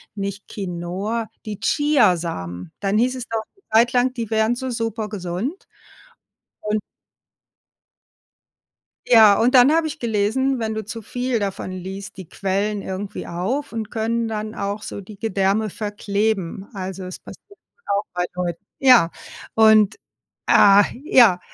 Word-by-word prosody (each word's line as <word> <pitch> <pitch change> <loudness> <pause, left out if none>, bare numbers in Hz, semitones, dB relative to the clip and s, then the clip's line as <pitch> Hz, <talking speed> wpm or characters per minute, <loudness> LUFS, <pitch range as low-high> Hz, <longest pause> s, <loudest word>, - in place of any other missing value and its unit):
nicht 200 0 -5
Quinoa 195 +4 -4 0.2
die 210 -2 -6
Chia-Samen. 170 - +1
Dann 200 +1 +1
hieß 250 +3 +2
es 250 -2 -6
doch 225 - -1 0.2
'ne 390 - -29
Zeit 235 +2 +5
lang, 250 +1 +2
die 230 -4 -4
wären 220 +1 +2
so 260 +1 -4
super 225 -2 -3
gesund. 210 - -5 0.9
Und 210 0 -1 2.3
ja, 220 -4 +7
und 245 +4 +3
dann 255 +3 +7
habe 325 -1 +2
ich 305 0 -5
gelesen, 235 +4 0
wenn 220 -1 -2
du 220 -1 -4
zu 230 +1 -7
viel 245 +2 -2
davon 195 -2 -4
liest, 190 +2 -7
die 190 -4 -10
Quellen 200 +1 -2
irgendwie 190 +1 -5
auf 230 +13 -3
und 220 -2 -4
können 230 0 -1
dann 215 0 -4
auch 200 +1 -3
so - - -6
die 200 +1 -12
Gedärme 205 0 0
verkleben. 205 -2 -2
Also, 190 0 -5
es 185 0 -7
passiert 400 - -15 0.3
auch 200 +1 0
bei 180 0 0
Leuten. 175 0 -4
Ja, 250 -11 +6 0.4
und, 220 -2 +5 0.5
ah, 200 0 +7 0.2
ja, 230 -11 +5
215 Hz, 140 wpm, -21 LUFS, 195-235 Hz, 2.3 s, ja